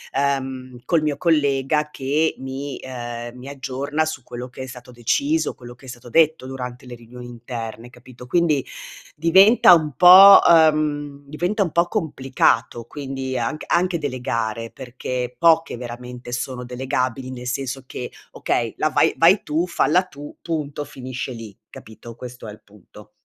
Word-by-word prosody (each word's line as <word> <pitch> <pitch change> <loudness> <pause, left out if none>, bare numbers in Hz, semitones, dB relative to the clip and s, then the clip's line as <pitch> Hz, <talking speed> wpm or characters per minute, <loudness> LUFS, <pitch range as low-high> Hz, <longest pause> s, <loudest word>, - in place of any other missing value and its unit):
ehm, 130 -2 -2
col 165 -3 +2
mio 150 -2 -1
collega 150 -2 +1
che 150 +3 -1
mi, 135 +1 -6
ehm, 120 -1 -7
mi 125 - -11
aggiorna, 140 +3 -3
su 155 -4 -5
quello 125 +1 -8
che 125 - -10
è 130 - -4
stato 125 -1 -11
deciso, 285 - 0
quello 120 -1 -12
che 130 +2 -19
è - - -9
stato 120 0 -11
detto, 160 -2 +3
durante 125 -1 -7
le 125 - -10
riunioni 120 +1 -12
interne, 120 -1 -8
capito. 125 0 -14
Quindi, 155 -3 +1 0.5
diventa 190 +6 +6
un 155 -4 +2
po', 185 +5 +10
ehm, 150 -3 +3
diventa 175 +8 -1
un 175 - -4
po' 170 +2 +2
complicato, 135 - 0
quindi, 135 -1 -5
anc 120 +6 -3
anche 180 0 +1
delegare, 115 -5 -3
perché, 125 -1 -5
poche, 165 -4 +3
veramente, 125 0 -8
sono 125 0 -4
delegabili, 130 0 -3
nel 125 -1 -8
senso 130 +1 -4
che: 125 - -7 0.2
"Okay, 115 -2 -2
la 155 - +1
vai - - +2
vai 175 +5 +5
tu, 160 +4 -1
falla 180 +1 +2
tu, 145 -5 -12
punto", 150 -4 -4
finisce 130 -2 -7
lì, 115 -4 -10
capito? 110 +1 -12
Questo 125 -1 -10
è - - -7
il 105 - -14
punto. 105 +1 -17
130 Hz, 155 wpm, -21 LUFS, 125-155 Hz, 0.5 s, po